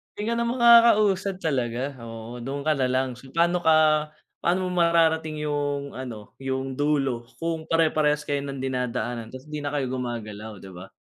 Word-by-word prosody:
Hindi 215 +3 -2
ka - - +1
na 235 - 0
makakausad 215 -6 +5
talaga, 130 -2 -1
oo, 115 +1 -8
dun 140 +3 -4
ka 155 - +2
na 135 -4 +1
lang 130 -1 -1
so 135 - -14
paano 170 +1 +3
ka 155 -2 +4 0.3
paano 180 +1 0
mo 180 - -1
mararating 160 -2 +2
yung 145 -1 -2
ano 120 -5 -8
yung 135 0 -3
dulo 135 -5 0
kung 165 -1 -3
pare-parehas 155 -2 +2
kayo 145 -1 -1
ng 135 -1 -5
dinadaanan 125 -3 -2
tapos 130 +2 -10
hindi 150 - -3
na 145 0 -3
kayo 130 -3 -1
gumagalaw, 110 -4 -5
di 95 - -10
ba? 90 +2 -10
145 Hz, 175 wpm, -25 LUFS, 125-165 Hz, 0.3 s, makakausad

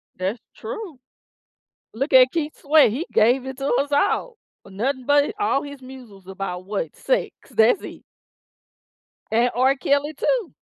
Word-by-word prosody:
That's 190 +5 -3 0.2
true. 310 - -7 0.9
Look 270 +6 -3
at 255 0 +7
Keith's 310 -2 -4
way, 295 -4 +5
he 280 - -3
gave 245 +4 +3
it 265 0 -7
to 275 0 -3
us 285 +1 -2
all 450 +11 0 0.3
for 195 - -15
nothing 255 +6 -2
but 285 0 +4
hi 420 - -5
all 280 -6 +1
his 285 -2 -9
muses 245 -8 -13
about 185 -1 -6
what, 195 -6 -4
sex. - - -1 0.2
That's 225 - +3
it. - - -10 1.3
And 240 +2 +2
R. 260 +2 +3
Kelly 285 +3 0
too. 450 - -1
265 Hz, 155 wpm, -22 LUFS, 225-290 Hz, 1.3 s, at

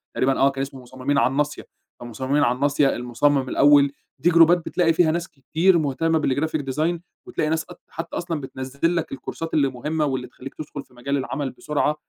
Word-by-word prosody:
تقريبًا، 135 +1 +1
آه، 135 - +5
كان 135 0 -4
اسمه 135 -1 -6
مصممين 130 +3 -2
على 130 - +3
الناصية، 145 +1 -2 0.3
فمصممين 130 +5 -1
على 125 -2 +2
الناصية، 140 +1 +2
المصمم 130 +3 +1
الأول، 145 -1 +5 0.3
دي 175 - +3
جروبات 170 +1 +6
بتلاقي 170 -3 +2
فيها 160 -1 +3
ناس 170 +1 -2
كتير 160 +6 +2
مهتمّة 160 +2 +1
بالGraphic 155 +3 0
Design 160 +5 0 0.3
وتلاقي 155 - -2
ناس 160 0 0
ق - - -12
حتّى 165 +1 -6
أصلًا 170 -3 -3
بتنزل 135 +5 -2
لك 165 -1 -2
الكورسات 165 +4 -6
اللي 140 -3 +3
مهمّة، 150 +5 -2
واللي 130 -2 -2
تخلّيك 130 +2 -10
تدخل 145 -2 -7
في - - -27
مجال 140 +3 -2
العمل 135 0 -3
بسرعة، 150 +2 -1
145 Hz, 190 wpm, -23 LUFS, 130-160 Hz, 0.3 s, جروبات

